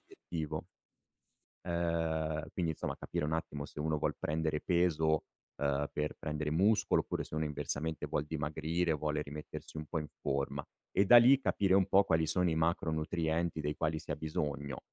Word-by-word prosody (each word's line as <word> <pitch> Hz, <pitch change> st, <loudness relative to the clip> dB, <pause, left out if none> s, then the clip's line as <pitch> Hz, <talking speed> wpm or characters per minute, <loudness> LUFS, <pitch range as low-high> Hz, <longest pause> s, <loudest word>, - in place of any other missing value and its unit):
obiettivo 80 Hz, -3 st, -5 dB, 1.0 s
uhm, 80 Hz, -2 st, 0 dB
quindi 85 Hz, -3 st, 0 dB
insomma -, -, -4 dB
capire -, -, -3 dB
un 80 Hz, -, -2 dB
attimo 75 Hz, -3 st, -3 dB
se -, -, -11 dB
uno 75 Hz, 0 st, 0 dB
vuol -, -, 0 dB
prendere 80 Hz, 0 st, -1 dB
peso, 80 Hz, -3 st, +2 dB, 0.4 s
uhm, 70 Hz, 0 st, +1 dB
per 75 Hz, 0 st, -2 dB
prendere 75 Hz, 0 st, -2 dB
muscolo 100 Hz, +7 st, +3 dB
oppure -, -, -3 dB
se -, -, -9 dB
uno 80 Hz, 0 st, 0 dB
inversamente 75 Hz, +1 st, -3 dB
vuol 75 Hz, 0 st, -1 dB
dimagrire, 80 Hz, +3 st, -1 dB
vuole 75 Hz, 0 st, -1 dB
rimettersi 75 Hz, +2 st, -7 dB
un 75 Hz, -, -4 dB
po' 80 Hz, +2 st, -3 dB
in 75 Hz, -1 st, -5 dB
forma 70 Hz, 0 st, -1 dB, 0.3 s
e 100 Hz, -, +3 dB
da 120 Hz, +4 st, +10 dB
lì 130 Hz, +3 st, +7 dB
capire 95 Hz, -7 st, +2 dB
un 95 Hz, -1 st, +5 dB
po' 100 Hz, +1 st, +5 dB
quali 80 Hz, -3 st, +2 dB
sono 90 Hz, +2 st, +2 dB
i 80 Hz, -, +1 dB
macronutrienti 80 Hz, 0 st, 0 dB
dei 75 Hz, 0 st, -2 dB
quali 80 Hz, -1 st, 0 dB
si 80 Hz, -, -10 dB
ha -, -, 0 dB
bisogno. 70 Hz, -3 st, -3 dB
80 Hz, 175 wpm, -33 LUFS, 75-85 Hz, 1.0 s, da